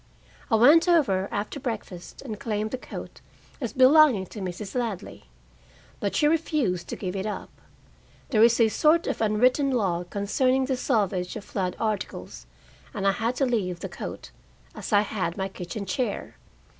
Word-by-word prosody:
I 225 - +4
went 295 +10 +6
over 240 - +3
after 210 +7 -4
breakfast 215 -9 -6
and 220 -6 -6
claimed 215 -1 -2
the 260 - -2
coat - - -9 0.4
as 240 - -2
belonging 260 -5 +6
to 215 - -7
Mrs. 190 +1 -5
Ladley. 225 - -4 0.7
But 200 - -2
she 295 - +3
refused 295 - 0
to - - -4
give 185 -1 -5
it 195 +2 -2
up. 210 - -5 0.8
There 220 -5 +3
is 235 +1 +5
a 230 - +6
sort 310 +8 +3
of - - -2
unwritten 250 +6 +3
law 190 -9 0
concerning 255 +8 +1
the 265 0 0
salvage 200 -8 0
of - - -6
flood 185 -3 -2
articles, 215 -2 -4 0.5
and 195 -2 -2
I 195 - +5
had 225 +5 -1
to 270 - +1
leave 195 -8 -1
the - - -5
coat, - - -7 0.4
as - - -7
I 205 -1 +5
had 195 -4 -3
my 190 -1 -1
kitchen 190 +2 -6
chair. 230 +6 -3
215 Hz, 170 wpm, -26 LUFS, 195-255 Hz, 0.8 s, went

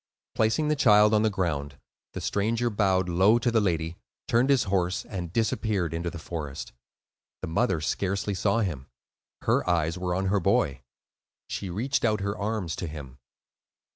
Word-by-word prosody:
Placing 110 +8 +1
the 150 - +2
child 105 -6 +5
on 105 - +4
the 110 - +3
ground, 75 -8 -2 0.4
the - - -5
stranger 115 +4 0
bowed 95 -3 +2
low 95 +6 +4
to 120 0 0
the 115 -1 +3
lady, 85 -3 -1 0.3
turned 120 +4 +2
his 135 -3 +4
horse, 95 -2 -1
and 90 -4 -5
disappeared 105 -4 0
into 85 +1 -2
the 85 - -8
forest. 80 -5 -6 0.7
The - - -2
mother 90 +2 +1
scarcely 100 +5 -1
saw 100 +4 +1
him; 80 -10 -3 0.6
her - - +1
eyes 85 0 +1
were 90 -1 -1
on 95 +1 -1
her 100 +1 +2
boy. 70 -6 +1 0.7
She 100 - -4
reached 125 +10 -1
out 105 -3 +1
her 100 +1 -2
arms 100 -5 -2
to 85 - -4
him. 70 -4 -9
95 Hz, 170 wpm, -27 LUFS, 85-110 Hz, 0.7 s, child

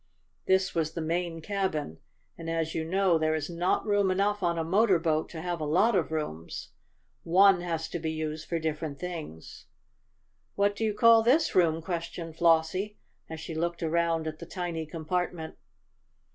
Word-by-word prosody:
This 190 0 +2
was 160 -1 -1
the 170 - -4
main 165 +1 -2
cabin, 160 - -2 0.4
and 165 0 -7
as 165 -1 -1
you 160 - -1
know 180 0 +2
there 155 0 +1
is 155 +2 -3
not 170 +2 0
room 205 -2 +2
enough 200 +2 +1
on 170 -2 +1
a 165 - 0
motor 190 +3 +3
boat 160 -1 0
to 160 - -7
have 175 -2 -3
a - - -1
lot 185 +10 +3
of 175 -4 0
rooms, 85 - -4 0.5
one 190 +2 +5
has 165 -2 -3
to 175 - -4
be 160 0 -2
used 155 0 -4
for 170 - 0
different 155 -2 -3
things. 160 - -8 0.9
"What 200 0 +2
do 225 - -3
you 215 -2 0
call 230 +1 +7
this 270 +8 +3
room?" 165 -3 +3
questioned 170 -1 -5
Flossie, 170 +5 +2 0.3
as 160 0 -6
she 160 - -6
looked 170 +2 -2
around 165 0 +1
at 155 0 -5
the 170 - -9
tiny 170 -3 -4
compartment. 165 +1 -3
170 Hz, 175 wpm, -28 LUFS, 160-185 Hz, 0.9 s, call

